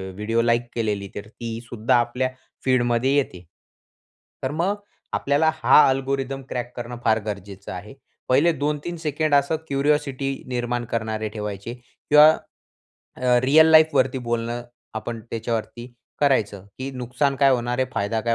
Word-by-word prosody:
Video 115 +3 0
like 120 0 +1
केलेली 105 -4 -1
तर 105 +1 -7
ती 115 0 -6
सुद्धा 115 0 +1
आपल्या 125 +2 0 0.4
फीड 130 -2 +3
मध्ये 130 +4 +2
येते. 90 -11 -1 1.0
तर 130 - -1
मग 175 +6 0 0.4
आपल्याला 145 +3 +2
हा 155 - +6
अल्गोरिथम 135 0 -1
क्रॅक 120 0 -4
करणं 120 0 -5
फार 110 0 +4
गरजेचं 100 -1 -6
आहे. 100 +7 -8 0.4
पहिले 145 +7 +4
2-3 150 +4 -3
सेकंड 155 -1 -1
असं 140 +3 +2
क्युरिओसिटी 140 -1 0 0.2
निर्माण 120 -1 -2
करणारे 110 -1 -2
ठेवायचे 105 +1 -5
किंवा 150 +4 +5 0.9
अ, 125 -1 +3
रिअल 160 +4 +6
लाईफ 160 0 +6
वरती 130 0 +2
बोलणं 120 +1 -2 0.3
आपण 115 +1 -5
त्याच्यावरती 115 +1 -4 0.3
करायचं, 110 -9 +1
की 135 +1 -4
नुकसान 125 +2 -1
काय 135 0 +5
होणार 125 0 0
आहे, 130 - +2
फायदा 110 +1 0
काय 115 -1 +1
125 Hz, 145 wpm, -23 LUFS, 115-140 Hz, 1.0 s, हा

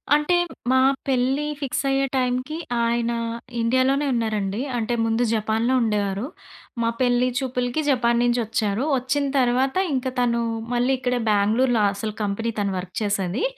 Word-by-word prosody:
అంటే 300 +4 +2 0.4
మా 260 - +4 0.3
పెళ్లి 265 +2 +1
ఫిక్స్ 280 +1 -2
అయ్యే 270 0 +2
టైంకి 255 +3 -1 0.3
ఆయన 235 0 0 0.5
ఇండియాలోనే 260 +5 +2
ఉన్నారండి. 215 -2 -1 0.2
అంటే 235 +1 -1
ముందు 225 +2 +1
జపాన్‌లో 220 +3 0
ఉండేవారు. 205 -1 0 0.6
మా 230 - +2
పెళ్లి 245 0 +3
చూపులకి 250 +1 -1
జపాన్ 235 -3 +2
నుంచి 245 0 +2
వచ్చారు. 215 +1 -1
వచ్చిన 265 +3 -1
తర్వాత 255 +2 +2 0.2
ఇంకా 260 0 -1
తను 235 -1 +1 0.3
మళ్ళీ 245 +2 +2
ఇక్కడే 250 -1 0
బెంగుళూర్‌లో 215 +3 +2
అసలు 215 +1 -4
కంపెనీ 215 +3 -2
తను 200 -1 0
వర్క్ 180 0 -7
చేసేది. 200 +1 -1
240 Hz, 135 wpm, -23 LUFS, 220-260 Hz, 0.6 s, మా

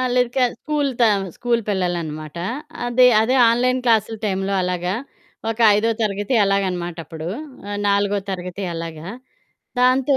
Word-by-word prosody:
ఆహ్, 255 -1 0
లే 250 - +5
క - - 0 0.2
స్కూలు 295 -2 -1
త 235 - +7 0.3
స్కూలు 235 -1 0
పిల్లలనమాట. 170 -5 -3 0.5
అదే, 250 +1 +5
అదే 250 +4 +2
ఆన్‌లైన్ 255 +2 +2
క్లాసులు 225 -1 +2
టైంలో 195 -1 -1
అలాగా 180 +1 -1 0.6
ఒక 225 - -5 0.2
ఐదో 225 +2 +2
తరగతి 205 +4 -1
అలాగనమాటప్పుడు 175 -4 -2 0.6
నాలుగో 200 0 +2
తరగతి 180 +1 -5
అలాగా. 165 0 -6 0.7
దాంతో 260 +2 +4
200 Hz, 125 wpm, -21 LUFS, 180-245 Hz, 0.7 s, త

